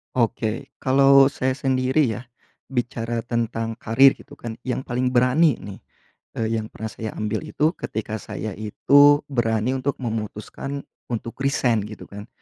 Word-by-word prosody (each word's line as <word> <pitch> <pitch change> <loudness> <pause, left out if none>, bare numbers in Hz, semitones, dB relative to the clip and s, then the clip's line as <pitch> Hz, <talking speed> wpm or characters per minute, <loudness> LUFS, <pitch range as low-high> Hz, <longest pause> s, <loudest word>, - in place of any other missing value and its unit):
Oke, 115 -1 -1
kalau 135 +1 +6
saya 130 -2 -1
sendiri 130 -1 +1
ya, 120 - -7 0.5
bicara 120 -2 -2
tentang 115 -1 -2
karir 130 +4 +5
gitu - - -15
kan 115 -1 -6
yang 130 0 -2
paling 125 +1 -1
berani 130 +4 +3
nih, 100 -1 -9 0.6
eee, 115 0 0
yang 110 - -5
pernah 110 - -5
saya 110 -1 -5
ambil 110 0 -2
itu 155 +4 0
ketika 110 0 -4
saya 110 -3 -5
itu 145 +7 +5
berani 120 -1 0
untuk 135 +2 -2
memutuskan 115 +4 -5 0.3
untuk 115 0 -4
resign 125 -4 +2
gitu 105 - -10
kan 105 +2 -10
120 Hz, 145 wpm, -23 LUFS, 110-135 Hz, 0.6 s, kalau